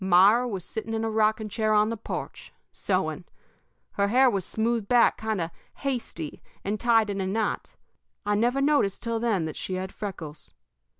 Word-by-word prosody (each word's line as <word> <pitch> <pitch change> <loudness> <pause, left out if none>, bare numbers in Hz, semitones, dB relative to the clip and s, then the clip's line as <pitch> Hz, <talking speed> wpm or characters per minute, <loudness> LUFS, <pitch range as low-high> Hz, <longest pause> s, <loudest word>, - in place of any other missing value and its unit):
Myra 195 +7 +5
was 195 -7 -4
sitting 225 0 -4
in 225 0 -1
a 225 - -1
rocking 220 0 +2
chair 215 0 +1
on 210 +1 +4
the - - -1
porch, 225 - -6 0.2
sewing. - - -1 0.7
Her 200 0 +1
hair 255 +4 +5
was 195 -3 -1
smoothed 225 -1 0
back 245 +1 +5
kind 220 -2 -2
of 165 -1 -2 0.2
hasty 245 - -4 0.2
and 205 +1 -1
tied 225 -3 +3
in 195 -1 -2
a 190 - -1
knot. 210 +2 -2 0.5
I 205 - +1
never 240 +6 +2
noticed 280 -9 +2
till 230 -1 -1
then 220 -8 +1
that 155 - -5
she 185 - -3
had 185 +1 -4
freckles. 165 -7 -7
215 Hz, 180 wpm, -27 LUFS, 195-230 Hz, 0.7 s, Myra